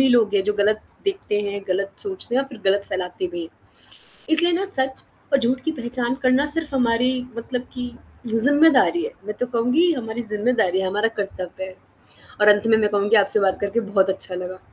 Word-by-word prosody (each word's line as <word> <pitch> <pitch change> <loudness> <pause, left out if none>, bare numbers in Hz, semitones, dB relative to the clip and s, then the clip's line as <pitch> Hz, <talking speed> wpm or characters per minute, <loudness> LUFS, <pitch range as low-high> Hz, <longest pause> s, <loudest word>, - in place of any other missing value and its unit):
ही 270 - +5
लोग 225 -4 +3
है 195 - +3
जो 210 +1 0
गलत 215 +1 +2 0.2
देखते 390 - -1
हैं, 200 0 -3
गलत 195 +1 -1
सोचते 380 -11 -3
हैं 270 - +3
और 270 - -9
फ़िर 255 -5 -12
गलत 200 +1 +2
फ़ैलाते 185 -1 -3
भी 175 - -4
हैं, 165 - -8 0.8
इसलिए 335 +2 +4
ना 385 +3 0
सच 265 -8 -2 0.3
और 275 - +5
झूठ 255 +1 +1
की 320 - +1
पहचान 245 -3 -3
करना 255 +2 +3
सिर्फ़ 315 -2 -4
हमारी 245 0 +2 0.3
मतलब 245 +1 -3
कि 245 -1 -5 0.4
ज़िम्मेदारी 290 - +4
है। 470 - -4 0.2
मैं 210 - -2
तो 250 - +1
कहूँगी 255 +10 +3
हमारी 235 -3 -4
ज़िम्मेदारी 210 -4 +1
है, 190 - 0
हमारा 210 +4 +1
कर्तव्य 190 -2 -5
है 190 0 -8 0.7
और 210 - +5
अंत 210 +1 +5
में 220 -1 +5
मैं 210 -1 +2
कहूँगी 205 +2 +2
आपसे 215 - +4
बात 190 -1 +1
करके 205 +3 0
बहुत 200 -3 +1
अच्छा 190 -1 -3
लगा। 180 +1 -6
230 Hz, 205 wpm, -22 LUFS, 200-265 Hz, 0.8 s, ही